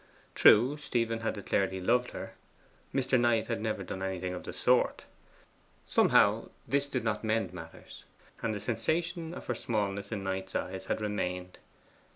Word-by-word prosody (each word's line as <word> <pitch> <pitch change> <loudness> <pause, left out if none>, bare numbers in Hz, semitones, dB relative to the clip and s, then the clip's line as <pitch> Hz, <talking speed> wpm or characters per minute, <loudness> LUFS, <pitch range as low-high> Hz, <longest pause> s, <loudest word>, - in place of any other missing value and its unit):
True, 125 +7 +6
Stephen 115 -6 -1
had 115 - -2
declared 100 -2 0
he 95 - -4
loved 120 +6 +2
her: - - -7 0.6
Mr. 130 -1 +2
Knight 120 -2 +3
had 115 -2 -2
never 110 -3 -2
done 95 +1 -6
anything 95 -1 -2
of 90 - -6
the - - -5
sort. - - +2 0.8
Somehow - - +4 0.2
this 140 0 +1
did 130 -4 -2
not 110 -1 -1
mend 110 -4 0
matters, 80 -2 -11 0.4
and 115 - 0
the - - -3
sensation 160 - -1
of - - -8
her 120 - -1
smallness 100 -3 -2
in 105 -3 -3
Knight's 95 0 -3
eyes 95 +1 -3
still - - 0
remained. 90 -4 -3
110 Hz, 165 wpm, -30 LUFS, 95-120 Hz, 0.8 s, True